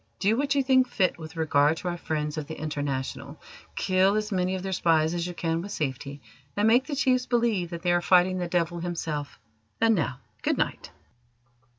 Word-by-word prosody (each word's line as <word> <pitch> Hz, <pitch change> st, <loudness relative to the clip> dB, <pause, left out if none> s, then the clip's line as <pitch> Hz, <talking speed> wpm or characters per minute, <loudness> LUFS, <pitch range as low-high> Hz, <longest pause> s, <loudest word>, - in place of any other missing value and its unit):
Do 205 Hz, +3 st, +2 dB
what 285 Hz, +3 st, 0 dB
you 275 Hz, -, +3 dB
think 260 Hz, -1 st, +4 dB
fit 185 Hz, -7 st, 0 dB
with 160 Hz, +1 st, -9 dB
regard 155 Hz, -1 st, +3 dB
to 180 Hz, -, -5 dB
our 175 Hz, -, -1 dB
friends 150 Hz, -2 st, -3 dB
of 155 Hz, -2 st, -4 dB
the 160 Hz, -, -7 dB
International. 145 Hz, -3 st, -4 dB, 0.4 s
Kill 190 Hz, +1 st, +2 dB
as 215 Hz, 0 st, -1 dB
many 185 Hz, -1 st, 0 dB
of 185 Hz, -, -5 dB
their 190 Hz, -, -3 dB
spies 160 Hz, -3 st, +2 dB
as 175 Hz, 0 st, -2 dB
you 175 Hz, -, -6 dB
can 165 Hz, -1 st, -1 dB
with 200 Hz, +3 st, -7 dB
safety, 140 Hz, -, -4 dB, 0.3 s
and 205 Hz, +1 st, +3 dB
make 245 Hz, +4 st, +4 dB
the 290 Hz, -, -3 dB
chiefs 255 Hz, -2 st, +2 dB
believe 230 Hz, -7 st, +1 dB
that 170 Hz, -1 st, -7 dB
they 175 Hz, -, +2 dB
are 175 Hz, 0 st, +3 dB
fighting 180 Hz, +2 st, +4 dB
the 175 Hz, -, -2 dB
Devil 170 Hz, 0 st, 0 dB
himself. 160 Hz, -4 st, -4 dB, 0.4 s
And 225 Hz, 0 st, +4 dB
now, 140 Hz, -, -1 dB, 0.2 s
good -, -, 0 dB
night." -, -, -2 dB
175 Hz, 205 wpm, -27 LUFS, 155-205 Hz, 0.4 s, think